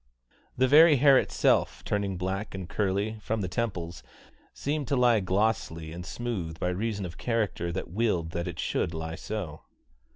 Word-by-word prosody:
The 130 +1 +4
very 155 +3 +8
hair 135 0 +6
itself, - - +1
turning 100 -2 -1
black 95 +3 -3
and 95 -2 -5
curly, 105 +3 -1
from 110 +1 -2
the 95 - -2
temples, 85 -3 -3 0.5
seemed 145 -1 -3
to 140 - +1
lie 120 -3 +4
glossy 95 -5 -1
and 90 +1 -6
smooth 90 -6 -4
by 90 - 0
reason 100 +2 -2
of 85 -1 -8
character 105 -7 -1
that 90 -1 -5
willed 90 -6 0
that 85 +1 -3
it 85 -3 -6
should 80 - -1
lie 80 0 -4
so. 90 -4 -5
95 Hz, 165 wpm, -28 LUFS, 85-115 Hz, 0.5 s, very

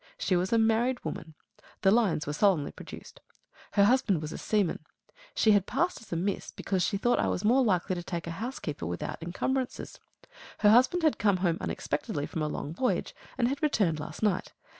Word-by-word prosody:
She 190 - 0
was 180 +1 0
a 230 - +4
married 225 +3 +2
woman. 160 -1 -6 0.5
The 190 - +6
lines 205 -8 +2
were 145 - -3
solemnly 175 -4 +2
produced. - - -11 0.5
Her 200 - +5
husband 205 -5 +3
was 155 0 -5
a - - -6
seaman. 205 -7 0 0.5
She 220 - +4
had 205 -2 +3
passed 345 +10 -1
as 225 - -16
a - - -1
miss, 190 +4 -2
because 190 -2 -2
she 200 +4 +1
thought 240 +4 +2
I - - +1
was 180 - -1
more 255 +5 +5
likely 185 -5 +1
to 175 - -3
take 170 -1 -5
a 170 - -4
housekeeper 195 - -4
without 85 - -4
encumbrances. 250 +10 -3 0.6
Her 210 -1 +5
husband 260 +10 +4
had 310 - +2
come 200 -3 +3
home 175 -2 0
unexpectedly 145 0 -3
from 160 - -4
a 155 - 0
long 150 0 -4
voyage, 250 +8 -1 0.2
and 240 -2 +2
had 275 +3 -3
returned 200 - +1
last 150 - -7
night. 200 -4 0
200 Hz, 200 wpm, -29 LUFS, 170-240 Hz, 0.6 s, The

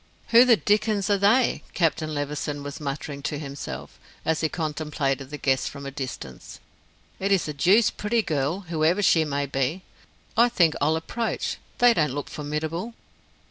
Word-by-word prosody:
"Who 235 +2 +8
the 235 -3 +6
dickens 210 -1 +1
are 200 - +4
they?" 225 +6 +3
Captain 160 -2 +1
Levison 145 0 -3
was 145 0 -6
muttering 140 0 -5
to 145 - -3
himself, 140 -1 -7 0.3
as 160 0 +1
he 160 - +1
contemplated 150 -4 -2
the 150 - -6
guests 135 -2 +1
from 140 -1 -8
a 140 - -5
distance. 130 - -7 0.6
"It's 195 -3 +1
a 150 - -3
deuced 195 +10 +3
pretty 225 +2 +1
girl, 155 +3 -1
whoever 170 +2 +1
she 160 -4 +4
may 140 -1 -1
be. 140 +6 -2 0.5
I 235 +2 +5
think 170 -9 +3
I'll 155 +3 +3
approach, 225 +8 -2 0.2
they 245 -1 +6
don't 150 - +1
look 145 - -4
formidable." 160 +9 -4
155 Hz, 160 wpm, -25 LUFS, 145-200 Hz, 0.6 s, Who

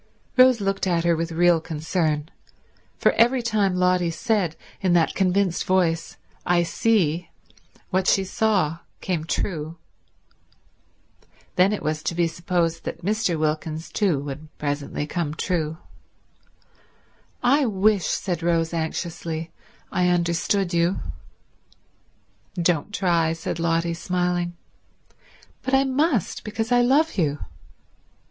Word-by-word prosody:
Rose 255 -2 +6
looked 195 -1 -1
at 170 -2 +1
her 170 -1 +3
with 165 +1 -3
real 170 0 +3
concern: 155 -1 -1 0.7
for - - +4
every 240 +2 +3
time 210 -5 +1
Lotty 180 -1 +2
said 170 +1 0 0.3
in 185 -2 +2
that 170 -2 +3
convinced 190 -1 +1
voice, 170 -3 0 0.3
"I 175 -1 +3
see," 175 -4 +1 0.6
what 190 0 +1
she 195 - +4
saw 190 -5 0 0.2
came 170 -4 -2
true. 165 -2 -3 1.8
Then 185 +2 +4
it 210 - -3
was 155 0 -1
to 170 - -2
be 170 0 +2
supposed 170 0 -1
that 170 +1 -6
Mr. 210 -4 +1
Wilkins 155 +1 -2
too 195 -8 +1
would 145 +2 -7
presently 145 0 -3
come 155 -1 -3
true. 160 -3 -1 1.7
"I 270 +2 +4
wish," 200 -3 +2
said 175 -4 -2
Rose 165 -1 +1
anxiously, 165 0 -3 0.4
"I 180 0 +2
understood 175 +2 +1
you." 170 +2 +2 1.6
"Don't 170 +2 +1
try," 170 -5 +1
said 165 0 -4
Lotty, 165 0 +1
smiling. 175 0 -1 1.0
"But 260 +1 +1
I 270 - +4
must, 270 - 0
because 225 +2 -3
I 245 0 +5
love 275 +1 +2
you." 150 -4 +1
175 Hz, 120 wpm, -24 LUFS, 165-195 Hz, 1.8 s, Rose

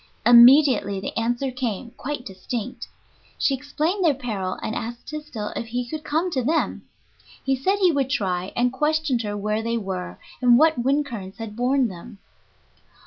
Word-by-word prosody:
Immediately 240 -3 +7
the 195 - -6
answer 240 +4 -1
came, 240 -2 -4
quite 265 0 -6
distinct. 215 +5 -5 0.5
She 275 - +2
explained 305 +8 -1
their 310 -5 +4
peril, 210 -8 -4
and 220 - -2
asked 235 +1 -6
Tysdell 300 -9 -6
if 230 - -4
he 245 +1 -3
could 310 +4 -6
come 325 +5 -1
to 265 - 0
them. 310 +6 -1 0.6
He 270 - +1
said 375 +10 +1
he 370 -3 +4
would 275 -4 0
try, 190 -8 -1
and 245 +1 +1
questioned 300 -2 +1
her 205 -2 -4
where 210 +2 -1
they 230 +1 -1
were 190 -4 -5 0.2
and 245 -1 +6
what 315 -1 +4
wind 280 +3 +2
currents 200 -8 -8
had 225 -2 -7
borne 255 +2 +2
them. 200 +3 -10
245 Hz, 170 wpm, -23 LUFS, 220-285 Hz, 0.6 s, Immediately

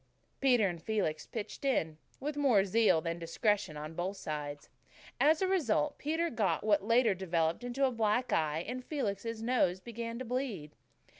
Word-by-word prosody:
Peter 245 -6 +4
and 170 -3 -5
Felix 195 -8 -1
"pitched 220 +3 -6
in," 160 - 0 0.2
with 290 +2 -3
more 255 -9 +4
zeal 205 -4 +3
than 165 +1 -3
discretion 170 0 0
on 155 +2 -6
both 185 +4 -3
sides. 145 -4 -5 0.5
As 310 +5 +4
a - - +2
result, 335 -5 +1
Peter 325 +3 -1
got 195 -9 0
what 205 -2 +3
later 230 0 +4
developed 170 0 -1
into 245 +3 0
a 260 - +1
black 230 +2 +1
eye, 155 +1 0
and 250 +2 -4
Felix's 225 -5 -3
nose 225 -7 +2
began 230 +2 -6
to 255 - -5
bleed. 230 - -3
215 Hz, 165 wpm, -32 LUFS, 170-250 Hz, 0.5 s, Peter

